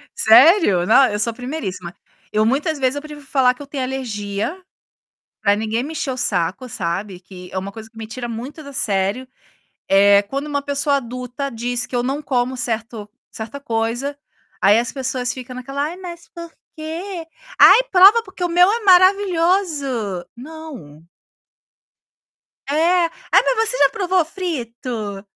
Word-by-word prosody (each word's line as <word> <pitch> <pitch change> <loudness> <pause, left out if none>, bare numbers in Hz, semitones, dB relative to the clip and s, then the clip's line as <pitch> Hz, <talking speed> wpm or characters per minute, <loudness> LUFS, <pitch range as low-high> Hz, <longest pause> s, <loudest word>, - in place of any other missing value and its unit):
Sério? 225 - +5
Não, 265 +6 +6
eu 205 0 -3
sou 230 +2 0
primeiríssima. 220 - -6 0.4
Eu, 215 +1 +2
muitas 290 +6 0
vezes 260 0 +1
eu 285 - -4
prefiro 300 -2 -11
falar 260 -2 +3
que 255 - -15
eu 280 - -9
tenho 275 -3 -4
alergia, 230 - -4 0.8
para 200 0 +3
ninguém 220 +2 -2
mexer 305 -2 -4
o 255 - -4
saco, 200 +1 -1
sabe, 185 0 -4
que 180 -1 -12
é 190 - -2
uma 195 +1 -5
coisa 220 +1 -10
que 225 - -31
me 225 -1 -7
tira 240 +2 -6
muito 255 +7 -7
do 280 -1 -10
sério, 200 +3 -1 0.6
é 200 +1 +5
quando 275 +8 -5
uma 285 -1 -2
pessoa 285 0 +1
adulta 250 +2 -5
diz 245 +1 -3
que - - -11
eu 240 - +1
não 275 +4 -2
como 255 -1 -1
certo 225 -3 -4 0.2
certa 230 +5 -8
coisa, 240 +4 -2 0.4
aí 205 +3 +5
as 240 +2 -1
pessoas 255 -2 -3
ficam 255 -1 -9
naquela: 275 +3 -4
"Ai, 320 +4 -5
mas 345 -2 -9
por 335 -1 -8 0.2
quê?", 330 +3 -6 0.3
"Ai, - - +8
prova 395 +5 +7
porque 375 -3 -10
o 355 - +1
meu 355 +2 +5
é 465 - 0
maravilhoso!". 350 - +2
Não. 260 - -11 1.7
É. 335 +4 +3 0.3
"Ai, - - +6
mas - - +2
você - - -1
já - - +5
provou 375 -5 0
frito?". 235 - -5
255 Hz, 160 wpm, -20 LUFS, 220-315 Hz, 1.7 s, Ai